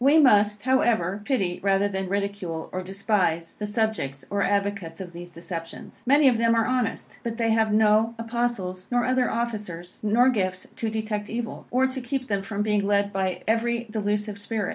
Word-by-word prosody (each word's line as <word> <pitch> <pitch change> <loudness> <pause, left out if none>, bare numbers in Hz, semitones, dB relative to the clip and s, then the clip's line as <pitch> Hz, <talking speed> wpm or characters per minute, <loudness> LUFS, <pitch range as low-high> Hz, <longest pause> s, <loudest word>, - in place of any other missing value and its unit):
We 285 +4 +6
must, 210 -7 +5
however, 220 -7 +2
pity, 195 -10 0
rather 195 0 +3
than 190 -2 -3
ridicule, 200 -5 -3
or 185 - -3
despise, 185 -3 0
the 210 - -2
subjects 205 - -1
or 200 0 0
advocates 200 -5 -1
of 180 -2 -7
these 175 +1 -8
deceptions. 170 -1 -8
Many 285 +2 +6
of 240 -3 +4
them 230 0 +3
are 225 -1 +3
honest, 250 -3 -2
but 230 -1 -4
they 230 -1 +1
have 220 -1 +3
no 215 +2 +4
Apostles, 230 -6 -2
nor 245 -1 +2
other 255 0 +2
officers, 210 -7 -4
nor 230 +5 +4
gifts 185 -6 -1
to 225 - -2
detect 215 -1 -3
evil, 230 0 -5
or 255 +2 +3
to 260 0 -2
keep 255 +1 -3
them 200 -2 0
from 200 +1 -3
being 210 -1 +1
led 200 0 +2
by 190 -1 -1
every 235 +1 +1
delusive 210 -1 -2
spirit. 205 -1 -2
210 Hz, 185 wpm, -25 LUFS, 195-230 Hz, -, We